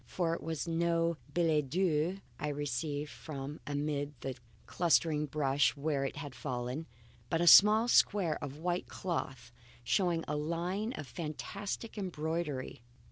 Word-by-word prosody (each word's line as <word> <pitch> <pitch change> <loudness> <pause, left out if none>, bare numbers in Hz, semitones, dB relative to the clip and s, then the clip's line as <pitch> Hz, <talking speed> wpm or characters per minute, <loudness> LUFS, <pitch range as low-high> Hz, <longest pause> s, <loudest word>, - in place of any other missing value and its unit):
For 170 -3 0
it 170 - -4
was 160 0 -3
no 170 0 +1
billet 155 -3 +2
doux 175 +1 +1 0.2
I 150 - -2
received 145 +1 -2
from 145 -1 -7
amid 145 -1 -2
the 135 -1 -4 0.3
clustering 160 -3 +2
brush 140 -1 +2
where 140 -1 0
it - - -3
had 145 -2 -6
fallen; 125 +4 -4 0.4
but 165 - +1
a 175 - +2
small 210 +6 +8
square 195 -10 +3
of 145 0 -6
white 175 +2 -2
cloth 135 -9 -4 0.3
showing 175 - +1
a 150 - -1
line 175 +9 -2
of 155 - -6
fantastic 195 - -5
embroidery. 160 - -3
155 Hz, 135 wpm, -33 LUFS, 145-175 Hz, 0.4 s, small